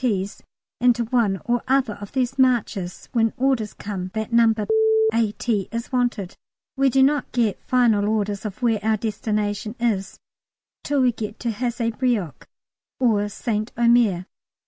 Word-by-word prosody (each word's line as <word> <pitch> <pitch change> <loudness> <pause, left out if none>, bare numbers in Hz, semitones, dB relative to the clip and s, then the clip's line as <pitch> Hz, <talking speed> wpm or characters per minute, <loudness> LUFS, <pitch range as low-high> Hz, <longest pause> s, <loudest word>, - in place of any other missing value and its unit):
T.'s 200 -5 -1 0.4
in 245 0 +5
to 235 0 -2
one 220 -5 +1
or 240 0 +1
other 260 -4 +2
of 205 - -8
these 260 0 -1
marches 225 -8 0
when 225 -2 +1
orders 255 -5 0
come 190 -3 -5
that 220 +1 -3
No. 230 -1 +5 0.6
A.T. 220 -2 0
is 230 +1 -5
wanted. 245 -7 -1 0.4
We 270 0 +3
do 265 +1 +4
not 285 0 +1
get 230 -5 0
final 225 -5 +2
orders 205 -2 -1
of 215 +3 -6
where 225 -3 +2
our 220 +1 +1
destination 210 0 -2
is 215 -5 -1 0.7
till 285 -2 +1
we 250 -1 +4
get 215 -2 -6
to 235 - -1
Hazebrouck 230 - -2 0.5
or 210 -5 +2
St 215 +1 -3
Omer. 235 -6 +3
225 Hz, 145 wpm, -23 LUFS, 205-245 Hz, 0.7 s, in